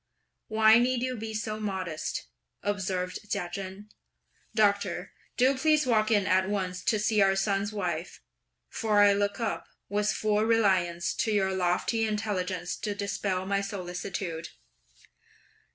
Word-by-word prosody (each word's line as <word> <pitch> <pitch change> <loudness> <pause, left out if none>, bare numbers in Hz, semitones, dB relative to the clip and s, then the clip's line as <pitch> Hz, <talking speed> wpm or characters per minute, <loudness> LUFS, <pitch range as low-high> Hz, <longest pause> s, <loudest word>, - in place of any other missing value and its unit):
"Why 220 +1 +6
need 250 0 +1
you 255 0 -1
be 220 -1 -5
so 215 0 -3
modest?" 190 -6 -3 0.4
observed 185 -3 -2
Chia 175 - -1
Chen; 195 +2 -6 0.7
"Doctor, 200 -4 +1 0.3
do 260 +2 +4
please 305 +2 +3
walk 220 -3 +2
in 205 -4 +3
at 190 +1 +2
once 185 -3 -2
to 220 - +3
see 215 0 +2
our 195 0 +4
son's 200 +1 0
wife, 180 -5 -3 0.5
for 215 -3 +2
I 205 0 +7
look 200 +2 0
up, 225 -2 -2 0.2
with 210 +1 +1
full 210 -1 +1
reliance, 190 -7 +2
to 220 - +1
your 190 -2 +1
lofty 185 +5 +1
intelligence 190 -4 -2
to 205 -1 -3
dispel 200 -2 -2
my 200 +1 0
solicitude!" 180 -3 -4
200 Hz, 135 wpm, -28 LUFS, 185-215 Hz, 0.7 s, I